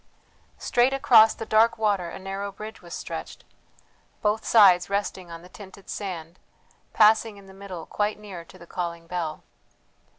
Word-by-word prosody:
Straight 250 +2 +2
across 225 -5 +6
the 225 - -6
dark 225 +2 +3
water 200 -5 0
a - - -8
narrow 195 +1 -5
bridge 215 +2 -10
was 175 -1 -9
stretched, - - -7 0.8
both 210 +1 +1
sides 190 -6 +5
resting 200 -3 -3
on 165 0 -9
the - - -13
tinted 200 -1 -12
sand, 175 -4 -6 0.5
passing 220 0 +4
in 200 - -15
the 190 - -14
middle 190 -4 -8
quite 210 0 -2
near 200 -5 -9
to - - -17
the 170 - -14
calling 170 -1 -5
bell. 165 -3 -4
200 Hz, 160 wpm, -25 LUFS, 175-215 Hz, 0.8 s, across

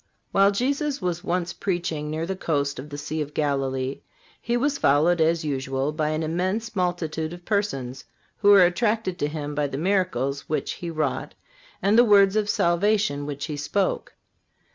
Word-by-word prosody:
While 195 0 +5
Jesus 275 +7 -1
was 175 -4 -2
once 175 0 -1
preaching 165 -5 -2
near 160 +2 -2
the 190 +2 -3
coast 145 -6 -1
of 145 +3 -8
the 145 - -6
Sea 150 +2 -3
of 150 0 -6
Galilee 135 -2 -1 0.4
He 235 +1 0
was 280 +3 0
followed, 160 +5 +3
as 160 0 +2
usual, 135 0 -1
by 155 0 -1
an 155 +1 -1
immense 185 +8 -2
multitude 170 -3 -1
of 175 0 -11
persons, 135 - -2 0.3
who 205 - +3
were 195 -3 +8
attracted 210 0 0
to 145 - +1
Him 150 -1 -5
by 145 0 0
the 135 - -5
miracles 170 -6 0
which 155 - -1
He 175 - -6
wrought 155 -4 -2 0.5
and 205 +4 +4
the - - +8
words 200 -3 +5
of 210 -1 +1
salvation 175 -5 +1
which 140 -1 -4
he 155 - -4
spoke. 185 +7 -1
170 Hz, 175 wpm, -24 LUFS, 145-200 Hz, 0.5 s, were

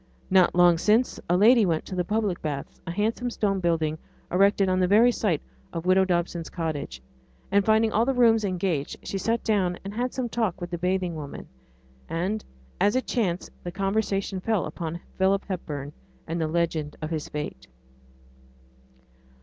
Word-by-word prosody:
Not 185 -2 +5
long 175 -1 +5
since 220 +7 +2
a 175 - +4
lady 230 +4 +6
went 165 -5 0
to - - -7
the 180 -1 0
'Public 210 -2 -1
Baths', 145 -3 -5
a - - -2
handsome 220 +6 -1
stone 200 -4 0
building 160 -3 0 0.3
erected 195 +1 +4
on 185 0 +2
the 180 - +3
very 220 +6 +6
site 190 -10 0 0.3
of 165 0 -5
widow 190 +1 +4
Dobson's 175 -2 -1
cottage, 145 - -4 0.5
and 200 0 +4
finding 220 +1 +3
all 220 - +3
the 265 +2 0
rooms 225 -3 +4
engaged 180 -6 -1
she 195 - -3
sat 230 +3 0
down 185 -5 +1
and 200 - -5
had 245 +3 -1
some 255 -2 -2
talk 220 -6 -1
with 175 -1 -6
the 175 - -3
bathing 180 0 0
woman; 150 -3 -7 0.6
and, 190 +6 -2 0.4
as 205 +3 +3
it 255 - +1
chanced, 185 -7 -1
the 175 - -4
conversation 195 0 -1
fell 215 0 0
on 170 -1 -4 0.2
Philip 195 +1 +2
Hepburn 150 -6 -5 0.3
and 165 +1 -3
the 160 - +1
legend 160 -2 -1
of 155 0 -5
his 155 -2 -3
fate. 150 - -6
185 Hz, 175 wpm, -26 LUFS, 170-210 Hz, 0.6 s, lady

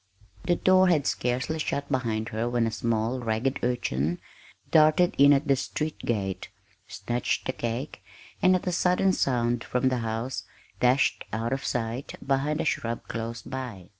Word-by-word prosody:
The 175 -1 +3
door 185 +1 +4
had 155 -6 +2
scarcely 125 +9 -1
shut 140 -2 -2
behind 115 -4 -1
her 115 +2 -2
when 120 -1 +1
a 115 - -1
small, 115 +2 -1
ragged 120 +3 -1
urchin 85 - -1 0.5
darted 155 +3 +5
in 140 +1 +8
at 145 +1 +3
the 140 - +4
street 150 +3 -3
gate, 100 -6 -2 0.4
snatched 120 +6 -2
the 130 - -1
cake, 120 -2 -4 0.4
and, 185 0 +5
at 180 - -2
a 180 - 0
sudden 180 +2 +2
sound 120 -5 0
from 125 +1 +1
the 130 -1 -1
house, 115 +3 -3 0.4
dashed 125 +2 +3
out 115 +3 -1
of 135 - -3
sight 120 +2 -3
behind 140 +3 0
a - - -2
shrub 115 0 -2
close 115 0 -5
by. 120 -9 -7
125 Hz, 165 wpm, -27 LUFS, 115-140 Hz, 0.5 s, in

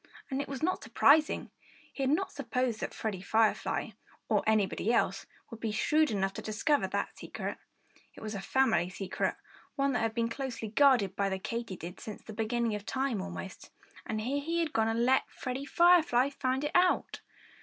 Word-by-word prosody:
And 265 +1 0
it - - -5
was 275 +1 -6
not 370 +3 +1
surprising. 285 +7 +3 0.4
He - - -5
had 265 - +2
not 380 +6 +1
supposed 250 -4 -2
that - - -3
Freddie 205 -5 -4
Firefly 220 +2 +1 0.4
or - - +3
anybody 215 0 +2
else 195 -4 +1 0.2
would 230 - -8
be 225 -1 -2
shrewd 305 +8 +2
enough 195 -2 0
to - - -6
discover 250 +8 +1
that - - -3
secret. - - -6 0.6
It - - -12
was 215 0 -5
a 200 - -4
family 190 -6 +2
secret 190 0 -2 0.4
one 275 -1 +1
that 245 - 0
had 225 0 -1
been 230 -1 +1
closely 230 -2 -4
guarded 225 -6 +4
by 200 -1 +1
the 190 - -1
Katydids 190 -4 -5
since 215 - -8
the 215 - -9
beginning 225 +1 0
of 210 -1 -4
time, 260 0 -1
almost. 190 0 -7 0.4
And 215 0 -2
here 275 +6 -1
he 335 +3 -1
had 320 -2 -2
gone 220 0 +2
and 230 +1 +1
let 260 +1 +3
Freddie 260 +1 -5
Firefly 320 -6 +4
find 265 0 -1
it 295 - -1
out! 360 0 +2
235 Hz, 185 wpm, -31 LUFS, 210-275 Hz, 0.6 s, guarded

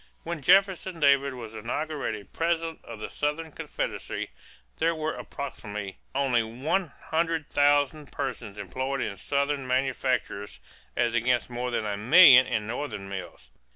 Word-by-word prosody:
When 170 -2 -4
Jefferson 190 +1 +3
Davis 140 -2 +4
was 115 -3 -8
inaugurated 115 -1 -4
President 165 -1 -1
of 110 - -9
the - - -4
Southern 150 +2 -2
Confederacy, - - -4 0.5
there 165 +1 +2
were 155 0 -2
approximately 105 -8 -6 0.2
only 135 -4 +3
one 130 +12 -1 0.2
hundred 165 -2 0
thousand 145 0 +2
persons 120 -7 -4
employed 130 +7 -3
in 100 - -2
Southern 140 +4 -1
manufactures 130 -5 -1 0.4
as 120 -1 +2
against 120 +1 +1
more 125 +1 -2
than 115 -2 -1
a 100 -1 -2
million 130 - +8
in 105 - -1
Northern 110 -4 -4
mills. 95 -1 -8
135 Hz, 135 wpm, -27 LUFS, 115-155 Hz, 0.5 s, million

